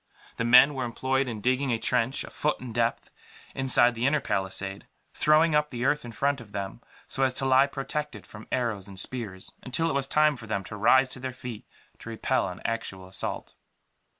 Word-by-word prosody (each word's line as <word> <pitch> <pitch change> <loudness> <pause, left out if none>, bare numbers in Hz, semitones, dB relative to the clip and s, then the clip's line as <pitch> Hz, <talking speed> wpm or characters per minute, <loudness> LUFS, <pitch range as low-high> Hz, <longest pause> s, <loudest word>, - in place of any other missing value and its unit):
The - - -1
men 125 +5 +7
were 130 -2 -3
employed 130 +3 0
in 110 -4 -5
digging 130 +4 +1
a 115 - +1
trench, 120 +3 0
a - - -10
foot 150 - -1
in 125 -3 -8
depth, 115 0 -1 0.4
inside 125 -2 +4
the 120 +3 0
inner 150 +2 +3
palisade; 95 -3 -3 0.3
throwing 155 +1 +4
up 150 0 +2
the 120 -2 -3
earth 150 +2 +2
in 120 - -8
front 140 +3 0
of 105 -3 -15
them, 100 +3 -5 0.3
so 135 - -3
as 130 -1 +3
to 135 - 0
lie 135 +1 +5
protected 150 +2 -5
from 110 0 -12
arrows 110 -6 -1
and 95 -1 -7
spears, 105 -6 -5
until 165 +6 -1
it - - -2
was 135 -1 0
time 150 +1 +3
for 110 -3 -11
them 100 -2 -2
to 105 - -8
rise 130 +5 +4
to 125 - -8
their 130 0 -5
feet 125 -4 -8 0.3
to - - -9
repel - - 0
an - - -9
actual 95 -5 -4
assault. 95 - -4
125 Hz, 205 wpm, -27 LUFS, 110-135 Hz, 0.4 s, men